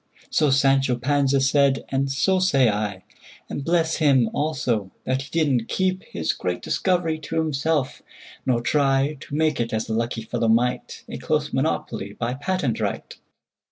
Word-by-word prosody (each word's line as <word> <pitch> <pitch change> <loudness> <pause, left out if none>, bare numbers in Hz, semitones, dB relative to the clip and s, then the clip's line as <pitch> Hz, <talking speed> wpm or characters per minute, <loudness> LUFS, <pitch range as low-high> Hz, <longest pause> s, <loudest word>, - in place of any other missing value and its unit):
So 150 -2 +3
Sancho 135 -1 +3
Panza 140 +2 +1
said, 135 0 +2
and 135 0 0
so 150 +8 +2
say 140 -10 +4
I:And 105 +6 -6
bless 165 0 +1
him, 135 -7 +3
also, 130 -9 -1
that 130 +1 -1
he 135 - -9
did 165 -2 +1
n't 125 -5 +1
keepHis 185 - -1
great 90 -1 -3
discovery 175 -4 0
to 160 +1 -6
himself; 155 -2 0 0.4
nor 120 -3 0
tryTo 140 +1 +1
make 155 0 +1
it—as 115 -2 -1
the 110 - -4
lucky 115 0 -2
fellow 115 0 -1
might—A 120 +2 -1
close - - -1
monopoly - - -2
by 120 +1 -3
patent 145 -2 -1
right! - - -3
135 Hz, 145 wpm, -23 LUFS, 120-155 Hz, 0.4 s, say